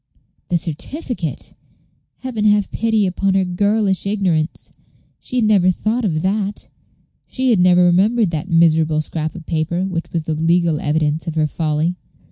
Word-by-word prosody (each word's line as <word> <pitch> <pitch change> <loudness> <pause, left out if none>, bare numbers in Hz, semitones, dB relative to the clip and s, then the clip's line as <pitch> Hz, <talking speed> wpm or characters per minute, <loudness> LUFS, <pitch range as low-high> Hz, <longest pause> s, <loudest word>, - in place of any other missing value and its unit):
The 175 - +2
certificate! 170 - -4 0.7
Heaven 245 -5 -3
have 205 -1 +2
pity 220 -2 +1
upon 190 +1 0
her 190 -1 +2
girlish 200 +1 0
ignorance! 180 -6 -1 0.5
She - - -7
had 240 -3 +2
never 200 -4 +4
thought 220 +6 -1
of 160 -7 -1
that; 200 +1 -2 0.6
she 260 -1 0
had 215 - +3
never 180 0 +5
remembered 195 +3 +3
that 160 +3 -4
miserable 160 -2 +3
scrap 155 0 -4
of 170 -3 -9
paper 165 +3 -1
which 175 -3 -4
was 165 -2 -2
the 160 - -2
legal 165 0 +1
evidence 150 +1 -1
of 165 - -3
her 155 -1 +2
folly. 155 +3 -1
180 Hz, 155 wpm, -19 LUFS, 160-205 Hz, 0.7 s, never